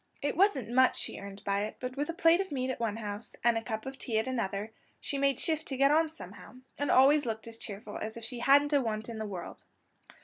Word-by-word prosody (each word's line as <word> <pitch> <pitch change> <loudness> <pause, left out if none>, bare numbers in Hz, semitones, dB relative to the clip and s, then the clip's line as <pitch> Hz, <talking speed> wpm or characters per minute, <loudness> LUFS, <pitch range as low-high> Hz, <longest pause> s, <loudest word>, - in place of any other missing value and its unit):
It 285 - -1
wasn't 295 - +2
much 260 +1 +4
she - - -4
earned 200 0 -9
by 200 0 0
it; 215 - -8
but 250 0 -5
with 290 +2 -2
a - - -1
plate 335 +2 +5
of 385 - -6
meat 260 -2 -1
at - - -6
one 225 -3 -1
house, 210 0 -6
and 235 0 +4
a 225 - 0
cup 220 -1 -4
of 265 0 -7
tea 225 -3 -1
at 220 - +1
another, 215 -4 -2 0.3
she 280 - -3
made 275 -2 +2
shift 315 -1 -1
to 265 - -4
get 275 +1 +5
on 320 +1 +4
somehow, 315 -4 -10 0.2
and 285 - 0
always 275 +1 +5
looked 220 0 -4
as 230 0 -9
cheerful 205 0 -7
as 220 +1 -5
if 230 - -8
she 235 +2 -4
hadn't 285 +4 +5
a 285 - +5
want 220 -1 -3
in 225 -1 -6
the 215 - -3
world. 180 -3 -7
245 Hz, 260 wpm, -30 LUFS, 220-285 Hz, 0.3 s, plate